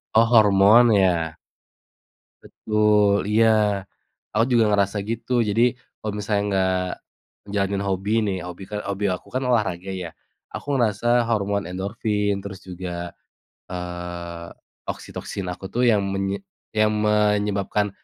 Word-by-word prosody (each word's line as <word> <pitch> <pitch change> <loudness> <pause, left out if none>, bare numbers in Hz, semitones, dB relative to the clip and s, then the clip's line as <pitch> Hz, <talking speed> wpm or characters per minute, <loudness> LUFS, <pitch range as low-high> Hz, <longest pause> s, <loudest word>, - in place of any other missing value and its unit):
Oh, 115 +1 +7
hormon 110 +1 +6
ya? 85 -5 +2 1.1
Betul, 105 -2 +2
iya 110 +2 +4 0.9
aku 110 +3 +3
juga 115 -1 +5
ngerasa 100 -1 +1
gitu. 115 +2 -4 0.2
Jadi 110 +3 +2 0.4
kalo 110 - -4
misalnya 105 0 0
nggak 95 -1 +1 0.7
jalanin 100 0 0
hobi 95 +2 -1
nih, 95 -2 -1
hobi 90 +2 -8
kan 105 0 -3
hobi 100 +1 -3
aku 90 -1 -4
kan 130 - 0
olahraga 100 -6 0
ya, 85 - -5 0.4
aku - - -7
ngerasa 110 -3 0 0.2
hormon 100 -3 0
endorfin, 105 +2 -1
terus 95 -1 -7
juga, 85 -1 -6 0.6
eee, 85 -1 -6 0.4
oksitoksin 100 - -6
aku 90 +2 -6
tuh 125 - +1
yang 105 -3 +3
menye 95 - -2 0.3
yang 110 0 +3
menyebabkan 105 -1 +1
100 Hz, 125 wpm, -23 LUFS, 95-105 Hz, 1.1 s, Oh